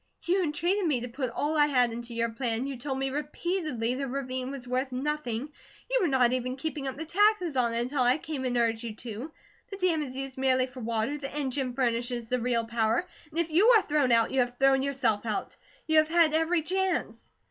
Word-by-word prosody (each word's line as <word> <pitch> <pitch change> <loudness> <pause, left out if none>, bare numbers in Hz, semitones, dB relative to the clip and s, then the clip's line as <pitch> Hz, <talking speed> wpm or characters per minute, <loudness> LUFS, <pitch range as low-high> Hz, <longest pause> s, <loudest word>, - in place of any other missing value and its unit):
"You 370 +2 +2
entreated 345 +4 0
me 280 -6 +1
to 245 - -4
put 255 +1 -3
all 290 +6 -1
I 295 -1 +5
had 250 -4 +3
into 235 +1 -6
your 230 0 0
plan, 235 0 -2
you 275 -1 -4
told 265 +2 -4
me 270 0 -1
repeatedly 295 -4 -2
the 275 +2 -3
ravine 260 -1 -3
was 270 -3 -7
worth 255 +2 -1
nothing, 270 -1 -2 0.4
you - - +3
were 360 - +3
not 255 -4 +3
even 255 0 -2
keeping 280 -1 -4
up 265 - -4
the 320 - -5
taxes 365 -2 +2
on 235 -2 +1
it 235 - +1
until 255 +3 -1
I 250 +2 +4
came 305 -4 -5
and 245 -1 0
urged 230 -1 +1
you 230 -3 -6
to, 235 +6 -7 0.4
the 395 - -6
dam 360 -5 +1
is 260 -3 -5
used 270 -1 -5
merely 260 -1 +3
for 255 0 -11
water, 230 +5 -1
the 275 -1 -5
engine 270 -2 -2
furnishes 240 -2 -1
the 250 - +1
real 235 -1 0
power, 230 +7 0 0.2
and 320 +2 -4
if 335 -1 0
you 365 +8 +5
are 415 - +1
thrown 290 -6 +1
out, 230 -1 +4
you 265 - +1
have 245 0 0
thrown 270 0 +4
yourself 255 -6 0
out. 220 -3 -3 0.3
You 315 -1 +5
have 310 0 +2
had 330 -2 +4
every 325 +1 +2
chance." 380 +2 -2
265 Hz, 225 wpm, -28 LUFS, 245-305 Hz, 0.4 s, I